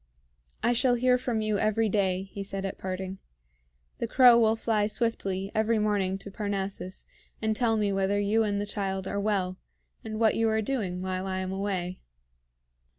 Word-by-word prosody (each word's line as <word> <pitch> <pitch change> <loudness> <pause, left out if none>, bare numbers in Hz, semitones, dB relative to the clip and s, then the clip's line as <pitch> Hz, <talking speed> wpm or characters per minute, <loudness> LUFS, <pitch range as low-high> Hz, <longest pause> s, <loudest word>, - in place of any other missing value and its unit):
"I 240 - +3
shall 245 +1 +3
hear 250 +1 +3
from 240 -3 -1
you 215 -1 0
every 220 +1 +2
day," 190 -2 +1
he 200 - -6
said 195 0 -4
at 195 - -5
parting. 190 0 -4 0.8
"The - - -1
crow 245 -3 +7
will 220 -1 +4
fly 220 -2 +1
swiftly 200 -4 -1
every 220 +1 +2
morning 205 -3 +1
to 200 +1 -8
Parnassus, 195 -2 -4 0.3
and 220 -1 0
tell 225 -1 +2
me 205 -2 +1
whether 195 +1 +1
you 205 +2 +2
and 205 -2 0
the 205 - -1
child 195 -2 -3
are 200 +1 -2
well, 190 -3 -1 0.4
and 220 -1 -5
what 225 -2 +4
you 225 0 +2
are 220 0 +1
doing 195 -8 -2
while 185 0 -2
I 190 -1 -2
am 185 0 -3
away." 190 -2 -2
205 Hz, 180 wpm, -28 LUFS, 190-220 Hz, 0.8 s, crow